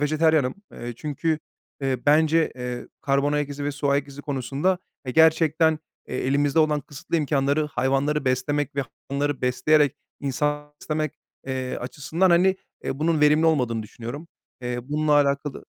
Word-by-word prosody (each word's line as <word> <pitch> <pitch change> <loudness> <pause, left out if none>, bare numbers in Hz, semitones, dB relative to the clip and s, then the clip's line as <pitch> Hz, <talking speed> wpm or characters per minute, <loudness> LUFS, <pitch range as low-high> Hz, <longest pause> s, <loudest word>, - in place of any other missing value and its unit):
vejetaryenim. 155 -2 +2 0.2
Eee, 120 0 -6
çünkü, 155 +2 -1 0.4
eee, 135 -1 0
bence, 160 +2 +4
eee, 125 -1 -5
karbon 140 +1 +1
ayak 150 -1 0
izi 145 0 -5
ve 145 - -1
su 145 0 -2
ayak 140 0 +1
izi 140 +1 -10
konusunda, 140 +7 0 0.3
eee, 125 - -2
gerçekten, 160 0 +4 0.3
eee, - - -3
elimizde 140 +2 +2
olan 155 -2 +3
kısıtlı 145 +4 -4
imkânları 145 0 +1
hayvanları 135 +2 0
beslemek 135 +2 0
ve 140 - +2 0.3
hayvanları 140 -1 -1
besleyerek 145 +3 +3 0.2
insan 150 +2 -1
beslemek, 155 -1 -1 0.3
eee, 130 -1 -3
açısından, 160 +8 0
hani, 185 +2 +4 0.3
eee, 135 - -3
bunun 160 0 +1
verimli 150 +2 +5
olmadığını 125 -8 +1
düşünüyorum. 120 +9 -8 0.3
Eee, 125 0 -2
bununla 150 0 +1
alakalı 140 0 +1
145 Hz, 150 wpm, -24 LUFS, 135-155 Hz, 0.4 s, verimli